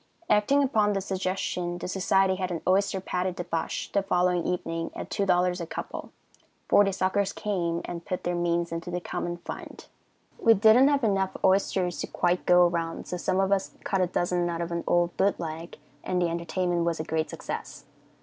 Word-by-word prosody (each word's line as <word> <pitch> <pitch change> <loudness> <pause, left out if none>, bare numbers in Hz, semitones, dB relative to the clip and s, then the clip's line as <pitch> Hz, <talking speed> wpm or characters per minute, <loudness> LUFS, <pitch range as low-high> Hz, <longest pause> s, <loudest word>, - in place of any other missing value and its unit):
Acting 245 +8 +4
upon 215 -6 +2
this 195 -1 -2
suggestion, 185 -2 -2
the 175 - -5
society 190 0 +2
had 185 -1 -2
an 170 -2 -4
oyster 195 +1 +2
patty 185 0 -2
debauch 175 -2 -3
the 200 - +3
following 180 -2 +1
evening 165 -2 -2
at - - -7
$2 180 -2 +1
a - - -3
couple. - - -6 0.6
Forty 205 -1 +5
suckers 195 +1 0
came 175 -5 -2
and 170 -1 -6
put 185 - -4
their 175 - -1
means 170 -1 0
into 165 +1 -4
the 180 0 -2
common 175 0 -4
fund. 170 - -9 0.5
We 230 -2 +6
didn't 220 +6 +6
have 285 -2 +2
enough 195 -3 +1
oysters 190 -2 +2
to - - -3
quite 175 0 0
go 180 0 +7
around, 170 -1 -2
so 180 - -4
some 185 +1 0
of 195 0 +1
us 195 -1 0
cut 195 -2 0
a 180 - +2
dozen 175 0 0
out 170 -1 -3
of 170 0 -3
an 170 0 -2
old 175 0 +2
boot 200 +1 +2
leg, 165 0 -6 0.3
and 180 - -1
the 175 -1 +1
entertainment 170 +1 -1
was 170 -1 -1
a - - -1
great 160 0 -1
success. - - -6
180 Hz, 190 wpm, -27 LUFS, 170-195 Hz, 0.6 s, go